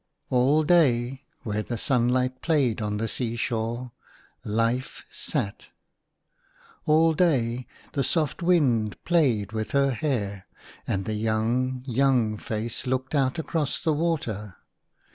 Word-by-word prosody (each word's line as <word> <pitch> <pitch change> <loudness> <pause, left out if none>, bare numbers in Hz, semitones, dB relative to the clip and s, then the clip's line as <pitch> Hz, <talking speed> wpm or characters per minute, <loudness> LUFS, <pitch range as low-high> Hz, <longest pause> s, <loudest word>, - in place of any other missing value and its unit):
LL 135 +5 +4
day, 135 -5 +2 0.2
where 105 -1 -2
the 120 +2 -4
sunlight 125 +1 +1
played 140 -9 +1
on 105 -1 -1
the 115 +2 -1
sea 115 +1 -2
shore, 120 +2 -2 0.5
Life 115 +5 -1
sat. 115 -10 -3 1.2
All 160 +1 +5
day 130 -8 +1 0.3
the 140 - +1
soft 155 +4 0
wind 130 - +2
played 125 - +2
with 110 -1 -4
her 140 -1 +3
hair, 105 -7 -2 0.4
and 95 0 -1
the 110 - -2
young, 115 +4 0
young 125 -4 +2
face 110 +4 -4
looked 130 +2 -1
out 135 0 +1
across 160 -3 -1
the 160 - +1
water. 120 - -2
125 Hz, 125 wpm, -26 LUFS, 110-140 Hz, 1.2 s, All